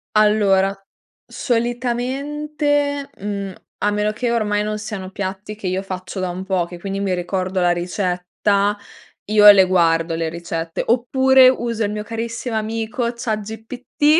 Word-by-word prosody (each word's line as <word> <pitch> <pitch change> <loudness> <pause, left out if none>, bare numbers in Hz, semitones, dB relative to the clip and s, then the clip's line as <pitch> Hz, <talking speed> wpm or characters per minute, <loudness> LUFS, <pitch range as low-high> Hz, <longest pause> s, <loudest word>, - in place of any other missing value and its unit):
Allora, 200 -2 +4 0.5
solitamente, 280 +4 -1
mhmm, 200 -1 -4 0.3
a 210 - +2
meno 210 +1 0
che 235 +2 -2
ormai 210 -3 +1
non 215 0 -3
siano 195 -3 -6
piatti 195 +2 -5
che 205 -3 -6
io 185 +2 -1
faccio 185 0 -6
da 185 -1 -1
un 185 +2 -5
po', 185 -3 0
che 175 0 -10
quindi 195 +1 -4
mi 195 -2 0
ricordo 185 +1 -2
la 175 - +3
ricetta, 180 +3 0 0.5
io 210 0 +7
le 190 -2 +6
guardo 165 -2 +2
le 165 0 -1
ricette, 165 -1 -4
oppure 260 +2 +5
uso 235 -3 -1
il 205 - -1
mio 210 0 -3
carissimo 230 +1 -4
amico, 225 +2 -2
Chat 220 -2 -2
GPT, 250 +8 0
210 Hz, 150 wpm, -20 LUFS, 185-235 Hz, 0.5 s, io